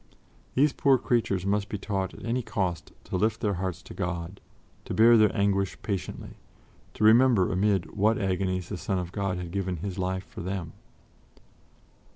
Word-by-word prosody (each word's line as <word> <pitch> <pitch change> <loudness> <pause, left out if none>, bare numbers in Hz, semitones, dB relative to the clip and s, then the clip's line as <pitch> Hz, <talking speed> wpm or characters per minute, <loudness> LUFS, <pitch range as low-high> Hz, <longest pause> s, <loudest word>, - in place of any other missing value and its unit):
These 140 +2 +4
poor 135 -2 +4
creatures 110 -7 0
must 100 +1 0
be 105 - -3
taught 95 -2 -3
at - - -10
any 120 +2 0
cost 95 -7 -3
to - - -3
lift 110 +3 +1
their 105 -3 0
hearts 95 -2 -4
to - - -11
God, 90 +1 -4 0.4
to - - -4
bear 115 +2 +7
their 110 -2 +6
anguish 100 -1 +1
patiently, 100 -6 -5 0.6
to - - -2
remember 115 -3 +5
amid 95 -1 0
what 110 +2 +3
agonies 95 -2 -1
the 100 - -4
Son 95 +1 -2
of 90 -1 -4
God 100 -2 -2
had 90 -2 -6
given 95 -2 -2
His 95 +3 -5
life 95 +1 -1
for - - -10
them. 90 -2 -4
100 Hz, 175 wpm, -27 LUFS, 90-105 Hz, 0.6 s, bear